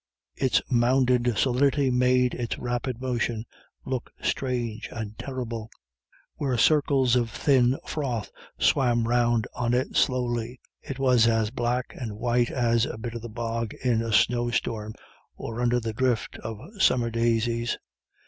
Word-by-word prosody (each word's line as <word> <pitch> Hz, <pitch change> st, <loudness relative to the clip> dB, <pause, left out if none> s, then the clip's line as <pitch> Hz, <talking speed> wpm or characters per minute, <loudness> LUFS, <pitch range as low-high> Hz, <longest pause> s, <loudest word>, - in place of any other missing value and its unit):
Its 130 Hz, -, +2 dB
mounded 125 Hz, 0 st, +3 dB
solidity 135 Hz, +1 st, +2 dB
made 125 Hz, 0 st, +3 dB
its 120 Hz, -2 st, -3 dB
rapid 125 Hz, 0 st, -3 dB
motion 120 Hz, -3 st, -2 dB, 0.4 s
look 130 Hz, -2 st, -3 dB
strange 120 Hz, -4 st, -2 dB
and 110 Hz, -2 st, -6 dB
terrible. 120 Hz, -4 st, -5 dB, 0.7 s
Where 135 Hz, -4 st, -1 dB
circles 140 Hz, -3 st, +3 dB
of 120 Hz, -2 st, +1 dB
thin 130 Hz, 0 st, +3 dB
froth 125 Hz, -9 st, -3 dB, 0.3 s
swam 120 Hz, -4 st, +2 dB
round 120 Hz, -1 st, +2 dB
on 120 Hz, -1 st, 0 dB
it 130 Hz, -, -1 dB
slowly, 120 Hz, -1 st, 0 dB, 0.2 s
it 135 Hz, -, -6 dB
was 125 Hz, -4 st, +4 dB
as 115 Hz, -2 st, +1 dB
black 125 Hz, 0 st, -1 dB
and 115 Hz, -5 st, -5 dB
white 120 Hz, +1 st, +1 dB
as 115 Hz, -1 st, +1 dB
a -, -, -6 dB
bit 115 Hz, +1 st, -5 dB
of 115 Hz, -, -6 dB
the 120 Hz, -, -7 dB
bog 115 Hz, 0 st, -3 dB
in 120 Hz, -3 st, +1 dB
a 115 Hz, -1 st, -3 dB
snowstorm 115 Hz, -1 st, +1 dB, 0.4 s
or 115 Hz, +1 st, -5 dB
under 120 Hz, 0 st, +2 dB
a 115 Hz, -2 st, -3 dB
drift 120 Hz, -2 st, 0 dB
of 110 Hz, -1 st, -6 dB, 0.2 s
summer 120 Hz, -7 st, +3 dB
daisies. 115 Hz, 0 st, 0 dB
120 Hz, 140 wpm, -26 LUFS, 115-125 Hz, 0.7 s, was